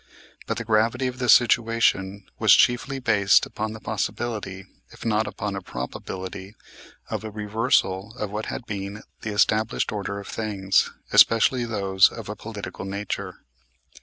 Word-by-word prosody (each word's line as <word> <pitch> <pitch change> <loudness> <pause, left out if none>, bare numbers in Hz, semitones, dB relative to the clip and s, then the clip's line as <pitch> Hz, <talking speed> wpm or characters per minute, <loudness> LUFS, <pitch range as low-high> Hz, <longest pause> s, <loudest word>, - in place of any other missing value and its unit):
But - - -2
the 115 - -3
gravity 115 +4 +2
of 125 0 -3
the 125 -1 -1
situation 115 -5 +3 0.2
was - - +7
chiefly 125 +3 +2
based 105 -6 +4
upon 110 0 -4
the 110 - -9
possibility, 105 -2 -4 0.2
if - - -12
not 110 -1 +1
upon 100 -1 -4
a 95 - -4
probability, 95 +2 -7 0.6
of - - -3
a 110 - -5
reversal 105 -1 0
of 105 -2 -4
what 105 +1 -4
had 120 - -5
been 100 0 -6 0.2
the 110 - -4
established 110 +1 +1
order 100 -1 -4
of 100 - -10
things, 100 -4 0 0.2
especially 120 +2 +5
those 100 -4 +3
of - - -8
a - - -4
political - - -7
nature. 100 +1 -5
105 Hz, 150 wpm, -24 LUFS, 100-115 Hz, 0.6 s, was